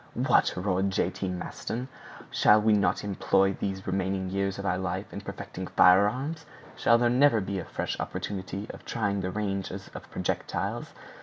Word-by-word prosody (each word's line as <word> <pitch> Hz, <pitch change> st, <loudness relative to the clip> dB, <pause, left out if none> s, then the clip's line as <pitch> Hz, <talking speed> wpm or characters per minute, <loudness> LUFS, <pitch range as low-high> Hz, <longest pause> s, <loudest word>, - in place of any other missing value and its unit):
"What!" -, -, +3 dB
roared 95 Hz, +1 st, +1 dB
J. 95 Hz, -, 0 dB
T. 95 Hz, -, -4 dB
Maston, 110 Hz, +7 st, -4 dB, 0.4 s
"shall 105 Hz, -, +5 dB
we 110 Hz, 0 st, +3 dB
not 105 Hz, 0 st, +2 dB
employ 95 Hz, -1 st, +2 dB
these 95 Hz, 0 st, -4 dB
remaining 95 Hz, 0 st, -1 dB
years 100 Hz, 0 st, -1 dB
of 100 Hz, -, -5 dB
our 90 Hz, -1 st, +1 dB
life 95 Hz, +1 st, -3 dB
in -, -, -5 dB
perfecting -, -, -7 dB
firearms? 125 Hz, -, +4 dB, 0.3 s
Shall 115 Hz, -, +4 dB
there 120 Hz, 0 st, +3 dB
never 125 Hz, 0 st, +4 dB
be 95 Hz, -1 st, -3 dB
a 85 Hz, -, -5 dB
fresh -, -, -4 dB
opportunity 100 Hz, 0 st, -4 dB
of -, -, -12 dB
trying 100 Hz, -3 st, -1 dB
the 90 Hz, -, -2 dB
ranges 95 Hz, -1 st, -3 dB
of -, -, -9 dB
projectiles? -, -, -3 dB
100 Hz, 165 wpm, -28 LUFS, 95-105 Hz, 0.4 s, shall